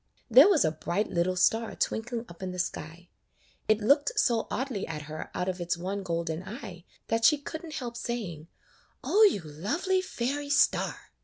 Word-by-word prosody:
There - - +9
was 365 -7 +4
a 155 - +2
bright 175 +6 -2
little 180 +2 +1
star 225 +5 +2
twinkling 235 +1 -2
up 170 +1 -14
in 190 - -3
the 180 - -7
sky. 175 0 -5 0.6
It 215 0 +3
looked 280 +6 +3
so 230 -3 +2
oddly 255 -6 -3
at 155 -2 -5
her 155 +1 -7
out 180 - -1
of 185 -1 -3
its 175 0 -1
one 190 +3 -3
golden 170 -3 -2
eye 190 -4 -9 0.2
that 225 0 0
she 290 +6 +6
could 315 +3 -7
n't 315 -3 -7
help 240 -2 -5
saying, 190 -11 -5 0.6
"O 420 - +3
you 380 - +3
lovely 285 - -1
fairy 285 -3 -3
star!" 285 - +1
210 Hz, 180 wpm, -28 LUFS, 175-255 Hz, 0.6 s, There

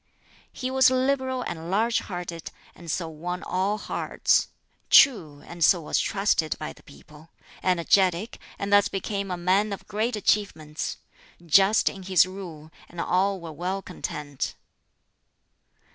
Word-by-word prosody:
He 255 0 -4
was 265 -1 +5
liberal 260 0 0
and 165 -4 -6
large 225 +4 +2
hearted, 175 -3 -6 0.2
and 170 -1 -12
so 165 +1 -2
won 175 +3 -5
all 195 +3 -1
hearts; - - 0 0.4
true, 160 - +5
and 170 -1 -4
so 175 - +5
was 150 - 0
trusted 195 -6 0
by 75 - -6
the - - -20
people; 150 - -17 0.3
energetic, 185 +3 +1 0.2
and 200 0 -2
thus 205 -1 +6
became 200 0 -4
a 180 - -3
man 190 +4 +1
of 200 - -7
great 220 +4 -1
achievements; 160 -8 -1 0.5
just 195 +6 +4
in 195 - -1
his 185 -2 +4
rule, 175 -5 -9 0.2
and 175 - -10
all 190 +3 +1
were 170 -2 -8
well 185 +5 -3
content. 150 -5 -5
185 Hz, 140 wpm, -25 LUFS, 165-205 Hz, 0.5 s, thus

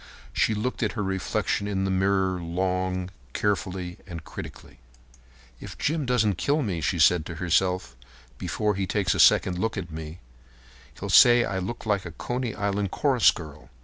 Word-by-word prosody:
She 110 - +2
looked 125 +6 -3
at 110 - 0
her 105 - -2
reflection 95 +1 -1
in 95 -2 -1
the 95 - 0
mirror 95 -1 +1
long, 90 +1 -2 0.2
carefully, 95 -2 -2
and 85 -3 -7
critically. - - -10 0.8
"If - - -9
Jim 155 -3 -1
doesn't 110 -7 +1
kill 145 +1 +1
me," 90 -7 -2
she 85 +4 0
said 85 +1 +4
to 85 - -6
herself, 90 -1 0 0.4
"before 105 -1 -1
he 95 -1 -2
takes 95 -3 +1
a - - -3
second 90 -1 +5
look 110 +2 -1
at 85 -3 -5
me, 80 +1 -7 0.8
he'll - - -4
say 120 0 +7
I 95 -2 -2
look 115 +7 -5
like 105 -3 +1
a 85 - -7
Coney 120 +2 -3
Island 100 0 -1
chorus 130 +1 +3
girl. 75 -3 -6
95 Hz, 170 wpm, -26 LUFS, 90-105 Hz, 0.8 s, say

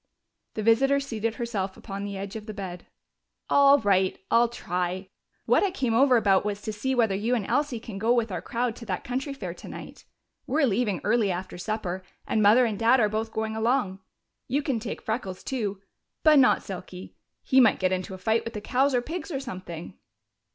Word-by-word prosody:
The 215 - -2
visitor 270 +6 +4
seated 230 -5 -3
herself 205 -6 -3
upon 195 0 -6
the 200 -1 -5
edge 200 +2 -6
of 215 0 -7
the 215 - -6
bed. 180 -3 -7 0.6
"All 280 0 +7
right, 190 -5 +2
I'll 235 +1 +5
try.... 180 -3 -3 0.4
What - - +4
I 400 - +2
came 255 -10 -1
over 255 +1 +5
about 195 -4 +3
was 205 -1 -2
to 215 - -3
see 265 +5 -1
whether 225 -5 +3
you 220 +6 0
and 215 -5 -2
Elsie 290 -2 0
can 220 -4 -8
go 225 +3 +2
with 235 -3 +2
our - - -3
crowd 240 -1 -2
to 230 - -9
that 185 -3 -3
country 265 +3 -3
fair 275 - -5
tonight. - - -10 0.4
We're 290 +3 +2
leaving 210 -4 0
early 215 -1 +2
after 180 +1 -5
supper, 190 -2 -3 0.2
and 220 - +1
Mother 220 +5 +6
and 215 -4 -2
Dad 235 +3 +5
are 215 -2 +3
both 220 +1 -2
going 220 0 -3
along. 220 -4 0 0.5
You 285 +3 0
can 270 -6 -1
take 220 -1 -6
Freckles 220 -5 -4
too 210 -7 -3 0.4
but 305 -2 +7
not 255 - +4
Silky. 185 -1 -8 0.3
He 265 - +4
might 225 -4 +5
get 185 -1 +1
into 185 0 -3
a - - -9
fight 220 +4 +1
with 230 0 -7
the - - -2
cows 265 +4 +1
or 245 - +1
pigs 330 +4 -5
or 280 -5 -2
something." 185 -8 -7
220 Hz, 205 wpm, -26 LUFS, 195-250 Hz, 0.6 s, All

